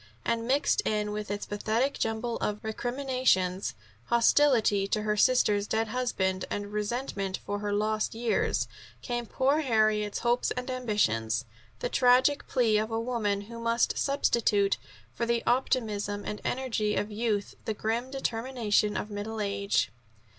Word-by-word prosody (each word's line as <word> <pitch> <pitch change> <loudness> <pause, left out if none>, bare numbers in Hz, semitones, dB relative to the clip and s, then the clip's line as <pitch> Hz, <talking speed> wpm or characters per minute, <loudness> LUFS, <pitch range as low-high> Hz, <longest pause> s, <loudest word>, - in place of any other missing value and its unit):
And, 230 0 0
mixed 285 +10 +2
in 210 - -1
with 210 -1 -4
its 205 0 -3
pathetic 220 +6 -1
jumble 225 +1 -1
of 210 0 -3
recriminations, 240 - 0 0.3
hostility 235 -4 +4
to 210 +1 -1
her 210 0 +1
sister's 210 -3 +3
dead 220 0 0
husband, 190 -6 -1
and 205 0 -4
resentment 210 -3 -2
for 205 0 -2
her 205 0 -2
lost 215 +1 0
years, 235 0 0 0.4
came 240 -2 -3
poor 275 +6 +2
Harriet's 215 -6 +2
hopes 240 +1 +1
and 250 +1 -3
ambitions, 130 - 0 0.4
the - - 0
tragic 255 +3 +4
plea 225 -4 +3
of 215 +1 -2
a 225 0 -1
woman 225 -4 -1
who 230 +3 -9
must 230 +1 +1
substitute 220 -7 +2 0.4
for 235 - -2
the 235 0 +1
optimism 210 -5 0
and 210 - -5
energy 225 -5 -1
of 210 - -1
youth 210 -1 -1
the 220 - -2
grim 230 +4 -2
determination 230 -5 0
of 210 - -4
middle 210 +2 -4
age. 200 - 0
220 Hz, 145 wpm, -29 LUFS, 205-245 Hz, 0.4 s, hostility